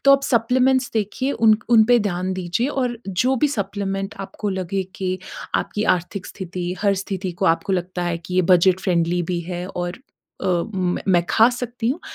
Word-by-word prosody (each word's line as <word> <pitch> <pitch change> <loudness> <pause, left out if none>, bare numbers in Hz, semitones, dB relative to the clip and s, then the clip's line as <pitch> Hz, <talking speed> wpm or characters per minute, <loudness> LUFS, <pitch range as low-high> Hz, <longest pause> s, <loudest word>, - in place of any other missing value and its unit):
तो 275 - +7
आप 275 0 +4
सप्लीमेंट्स 255 +1 +2
देखिए 225 +6 -1
उन 220 -1 +4
उनपे 235 +1 +6
ध्यान 185 -3 -1
दीजिए 185 +6 -1 0.2
और 240 -2 -2
जो 250 +8 +1
भी 295 +4 +2
सप्लीमेंट 195 -4 -3
आपको 195 +2 -5
लगे 190 0 -2
कि 185 -1 -2 0.4
आपकी 210 +1 -1
आर्थिक 180 +2 -6
स्थिति 180 -2 -5
हर 200 -1 +3
स्थिति 190 -2 -4
को - - +2
आपको 195 - -5
लगता 180 0 -2
है 170 -1 -1
कि 180 +2 -8
ये 185 - +4
बजट 185 +1 +4
फ्रेंडली 175 -1 +1
भी 170 - -1
हैं 175 +1 -5
और 175 +2 -4 0.4
अ, - - -3 0.3
मैं 180 -1 -1
मैं 175 -2 +4
खा 225 +2 +6
सकती 245 -1 -3
हूँ 285 +8 -1
195 Hz, 185 wpm, -22 LUFS, 180-230 Hz, 0.4 s, तो